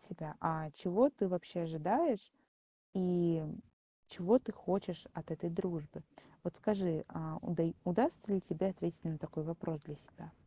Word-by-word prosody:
себя: 170 -7 -8
а 160 -2 0
чего 225 +10 +5
ты 210 -7 0
вообще 180 -1 -2
ожидаешь, 205 - +2 0.6
и 175 -3 +3 0.7
чего 210 +8 +5
ты 225 - -5
хочешь 185 -4 -2
от 170 0 -7
этой 160 +2 -2
дружбы? 170 -4 -3 0.4
Вот 175 - -3
скажи, 190 -7 +1
а 160 0 -5
удай 165 -1 0
удастся 210 - +2
ли 190 - +3
тебе 185 0 0
ответить 170 -3 -3
на 160 -2 -1
такой 155 +1 -5
вопрос 165 -1 -3
для 150 -3 -9
себя? - - -15
175 Hz, 150 wpm, -36 LUFS, 160-195 Hz, 0.7 s, чего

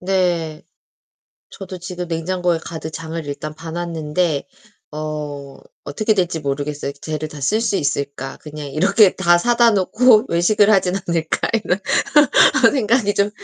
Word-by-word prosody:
네. 175 -4 -1 0.9
저도 190 -1 -9
지금 180 0 -6
냉장고에 175 +1 -1
가득 160 -1 -6
장을 165 +1 -6
일단 145 +1 -6
봐 160 +1 -9
놨는데 165 -2 -2 0.4
어 150 -2 -6 0.3
어떻게 215 +10 0
될지 180 -5 -1
모르겠어요. 145 0 -3
'쟤를 155 +1 -5
다 150 - -10
쓸 215 +11 +1
수 230 - 0
있을까. 140 -4 -3
그냥 150 -1 -9
이렇게 190 +8 +3
다 175 -2 +4
사다 235 +4 +3
놓고 215 +3 +4
외식을 205 +5 +3
하진 190 -3 +2
않을까' 165 -2 -1
이런 180 - 0 0.9
생각이 230 -5 +1
좀 200 +1 +1
170 Hz, 275 characters per minute, -19 LUFS, 150-195 Hz, 0.9 s, 다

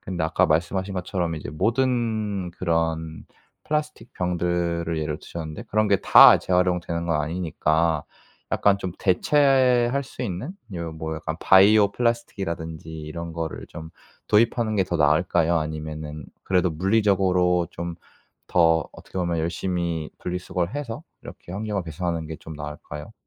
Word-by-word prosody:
근데 90 -3 -3
아까 80 - +2
말씀하신 95 +5 0
것처럼 90 -2 -2
이제 75 -3 -6
모든 110 - 0
그런 80 -3 -2 0.4
플라스틱 150 0 -3
병들을 85 -2 -1
예로 75 -1 -3
드셨는데 80 +6 -7
그런 110 -1 +1
게 100 -1 +3
다 - - +9
재활용되는 90 -2 0
건 80 -3 +1
아니니까 80 -1 0 0.5
약간 100 -1 +3
좀 95 -3 -4
대체할 130 +4 +3
수 130 - -8
있는? 115 - -4 0.2
요런 85 -3 -5
뭐 80 0 -4
약간 80 0 -4
바이오 100 +2 +6
플라스틱이라든지 85 -10 -2
이런 85 +2 -6
거를 80 -1 -5
좀 80 -1 -9 0.4
도입하는 110 +1 +2
게 95 - +3
더 90 -1 -2
나을까요? 80 +3 +3
아니면은 75 -1 -5 0.2
그래도 90 -1 +2
물리적으로 90 -1 +2
좀 85 0 -5 0.6
더 80 -2 +3
어떻게 - - -9
보면 85 -2 0
열심히 85 -1 -2
분리수거를 90 +2 -3
해서 140 -6 -5 0.2
이렇게 85 - -11
환경을 105 0 -2
개선하는 85 0 -3
게 80 - -6
좀 80 +2 -10
나을까요? 75 +4 -8
85 Hz, 335 characters per minute, -24 LUFS, 80-100 Hz, 0.6 s, 다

